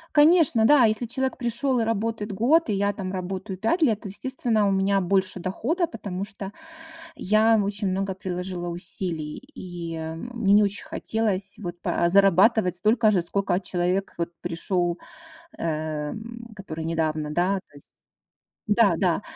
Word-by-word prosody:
Конечно, 295 -7 +5
да. 265 -2 +6
Если 220 +2 +1
человек 265 +3 -2
пришёл 245 +1 0
и - - +2
работает 225 -1 -2
год, 255 - +2
и - - +1
я 200 +1 0
там 190 -2 -5
работаю 190 +1 -5
5 315 - +1
лет, 220 -7 +2
то, 210 - -7
естественно, 225 -2 +1
у - - +2
меня 195 0 +2
больше 190 0 +1
дохода, 280 - -1
потому 200 -6 -5
что 200 -1 -7 0.7
я 215 +3 +3
очень 200 0 0
много 195 +1 -2
приложила 180 -1 -4
усилий. 170 -3 -4
И 170 -3 -6 0.4
мне 205 -4 +2
не 210 - +6
очень 200 +1 0
хотелось 205 -3 -1
вот 175 -3 -7
па 170 - +1
зарабатывать 195 0 +4
столько 215 +3 +3
же, 185 -4 +2
сколько 190 0 0
человек 180 +1 -1
вот 170 - -1
пришёл, 175 0 -1 0.6
э, 155 -2 -3 0.4
который 165 -5 -7
недавно, 155 -2 -1
да, 175 +4 +1 0.2
то - - -23
есть - - -9 0.8
Да-да. 195 -4 +3
195 Hz, 150 wpm, -25 LUFS, 180-220 Hz, 0.8 s, да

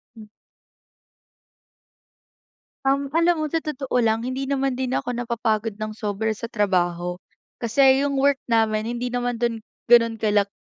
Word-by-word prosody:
Hmm. 220 - -11 2.6
Um, 275 +1 +1
alam 335 0 +3
mo 310 - -1
sa 325 +2 -2
totoo 285 -4 -5
lang, 225 +1 +1
hindi 260 +1 -3
naman 270 -1 0
din 255 0 -2
ako 245 -1 -2
napapagod 225 -3 -2
nang 215 0 -4
sobra 215 +1 -2
sa 230 +2 -7
trabaho, 180 -5 0 0.5
kasi 265 +3 +4
yung 280 -1 0
work 280 0 +2
namin 220 -2 +2 0.2
hindi 250 - -2
naman 245 -1 -2
dun 230 -2 -1 0.2
gano'n 230 -1 +5
kalak 205 -2 +1
235 Hz, 140 wpm, -23 LUFS, 215-270 Hz, 2.6 s, gano'n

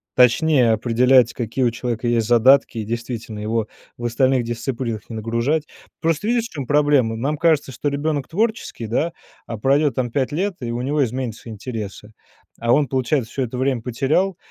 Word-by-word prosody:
точнее 125 0 +4
определять, 120 +2 +4
какие 120 +2 -2
у 120 - +4
человека 120 0 -3
есть 115 -2 +2
задатки, 120 +1 +4
и - - -2
действительно 115 -1 -5
его 110 +1 -1 0.3
в 120 - -6
остальных 130 +2 +2
дисциплинах 115 -1 -4
не 115 - -6
нагружать. 115 +8 -1 0.3
Просто 165 +3 0
видишь, 235 0 +1
в - - -8
чем 140 -4 -4
проблема? 145 -5 +3
Нам 140 +7 -2
кажется, 155 -4 +2
что 130 +4 -4
ребенок 145 0 -2
творческий, 215 - -2
да, 155 +9 -1 0.3
а 115 - -5
пройдет 140 +4 +2
там 125 0 -1
5 130 +2 -1
лет, 185 +5 -1
и 120 -1 -3
у 120 +1 -3
него 145 +3 +1
изменятся 120 -2 -5
интересы, 110 -1 -7 0.5
а 120 +1 +2
он, 145 +1 +3
получается, 130 -1 0
всё 135 - -2
это 125 +1 -4
время 130 -3 0
потерял, 155 +10 0
125 Hz, 180 wpm, -21 LUFS, 115-145 Hz, 0.5 s, точнее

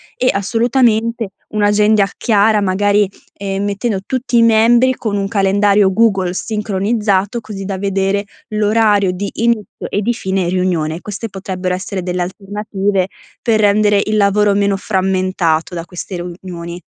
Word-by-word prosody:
e, 255 - +1
assolutamente, 230 +1 +1 0.2
un'agenda 210 -1 +3
chiara 215 -1 +3
magari, 200 +1 +2 0.2
ehm, 195 0 -3
mettendo 205 0 -1
tutti 250 -2 -1
i - - +6
membri 235 +3 +4
con 215 -3 -3
un 195 0 -1
calendario 200 -1 +3
Google 195 -4 +2
sincronizzato, 210 0 -1
così 210 -3 -7
da 195 0 -3
vedere 195 +1 0 0.2
l'orario 210 -2 +2
di 195 +3 -4
inizio 230 -2 -1
e 205 - -1
di 235 +4 0
fine 190 -5 -2
riunione. 175 -3 -1
Queste 210 +2 -6
potrebbero 185 -1 -4
essere 185 0 -4
delle 180 0 -1
alternative 195 0 -2 0.3
per 220 -3 +2
rendere 205 0 +3
il 215 - +1
lavoro 205 0 +3
meno 200 -1 +2
frammentato 185 -4 0
da 170 -1 -5
queste 180 +1 -7
riunioni. 175 0 -7
200 Hz, 140 wpm, -16 LUFS, 190-215 Hz, 0.3 s, i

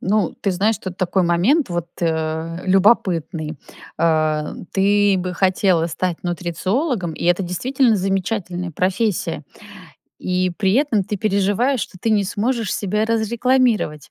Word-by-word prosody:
Ну, 210 +2 0
ты 200 - 0
знаешь, 205 +3 +1
тут 185 -1 -7
такой 185 0 +1
момент, 185 - +2
вот, 175 -1 -2
э, 160 +1 -2
любопытный. 180 -6 +2 0.4
А, 155 -2 +1 0.2
ты 200 0 +3
бы 180 0 -3
хотела 185 -2 +2
стать 175 +1 -3
нутрициологом- 180 - -2
и - - -6
это 175 +2 +2
действительно 235 +7 +1
замечательная 190 -2 -2
профессия. 190 +5 -1 0.7
И 185 0 0
при 195 -2 +2
этом 255 -6 +2
ты 205 +2 -4
переживаешь, 205 +6 +1
что 190 - -6
ты 225 - -1
не 210 -2 +3
сможешь 220 +2 -1
себя 210 +2 -1
разрекламировать. 230 - +1
190 Hz, 130 wpm, -20 LUFS, 175-215 Hz, 0.7 s, ты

